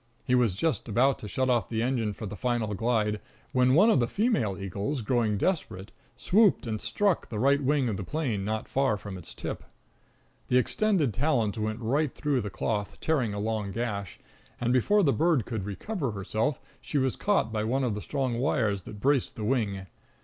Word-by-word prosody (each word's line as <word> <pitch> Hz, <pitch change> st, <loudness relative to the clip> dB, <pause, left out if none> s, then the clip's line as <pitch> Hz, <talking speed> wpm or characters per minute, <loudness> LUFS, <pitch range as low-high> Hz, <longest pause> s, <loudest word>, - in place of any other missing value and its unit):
He 125 Hz, -, -1 dB
was 120 Hz, -7 st, +3 dB
just 120 Hz, -, -1 dB
about 125 Hz, +5 st, +3 dB
to 105 Hz, -, -7 dB
shut 130 Hz, +5 st, 0 dB
off 120 Hz, -4 st, +1 dB
the 115 Hz, 0 st, -1 dB
engine 120 Hz, -4 st, 0 dB
for 110 Hz, -, -7 dB
the 105 Hz, 0 st, -6 dB
final 120 Hz, -3 st, -1 dB
glide, 105 Hz, 0 st, 0 dB, 0.3 s
when 130 Hz, +1 st, +4 dB
one 210 Hz, +8 st, +6 dB
of -, -, +4 dB
the 120 Hz, -, +2 dB
female 160 Hz, -, 0 dB
eagles, 100 Hz, -, -3 dB
growing 115 Hz, -3 st, +1 dB
desperate, 100 Hz, -, -2 dB, 0.3 s
swooped 205 Hz, -, +3 dB
and 110 Hz, -2 st, -3 dB
struck 200 Hz, -4 st, 0 dB
the 110 Hz, -, -4 dB
right 140 Hz, +5 st, +3 dB
wing 140 Hz, -1 st, +2 dB
of 105 Hz, -4 st, -1 dB
the 100 Hz, -, -4 dB
plane 120 Hz, -, -2 dB
not 110 Hz, +2 st, -2 dB
far 135 Hz, -6 st, +1 dB
from 100 Hz, -1 st, -8 dB
its 90 Hz, -3 st, -10 dB
tip. -, -, -5 dB, 0.8 s
The 125 Hz, -, +3 dB
extended 160 Hz, -, +2 dB
talons 115 Hz, -4 st, +1 dB
went 110 Hz, +2 st, -2 dB
right 140 Hz, +5 st, +1 dB
through 145 Hz, -4 st, 0 dB
the 105 Hz, -, -4 dB
cloth, 105 Hz, 0 st, -3 dB
tearing 130 Hz, -10 st, 0 dB
a -, -, -3 dB
long 105 Hz, -1 st, -2 dB
gash, 100 Hz, -5 st, -3 dB, 0.4 s
and, 120 Hz, +1 st, +1 dB
before 205 Hz, -, +3 dB
the 140 Hz, -5 st, +3 dB
bird 160 Hz, -, +2 dB
could 110 Hz, -5 st, -4 dB
recover 135 Hz, -, -3 dB
herself, 110 Hz, +8 st, -1 dB, 0.2 s
she 150 Hz, -, -3 dB
was 130 Hz, -2 st, +1 dB
caught 200 Hz, -, +1 dB
by 105 Hz, -1 st, 0 dB
one 130 Hz, +5 st, 0 dB
of 120 Hz, -4 st, 0 dB
the 105 Hz, -, -4 dB
strong 130 Hz, -3 st, -2 dB
wires 110 Hz, -7 st, +1 dB
that 105 Hz, -, -9 dB
braced 135 Hz, +2 st, +1 dB
the 110 Hz, -, -5 dB
wing. 105 Hz, -5 st, 0 dB
120 Hz, 200 wpm, -28 LUFS, 105-140 Hz, 0.8 s, one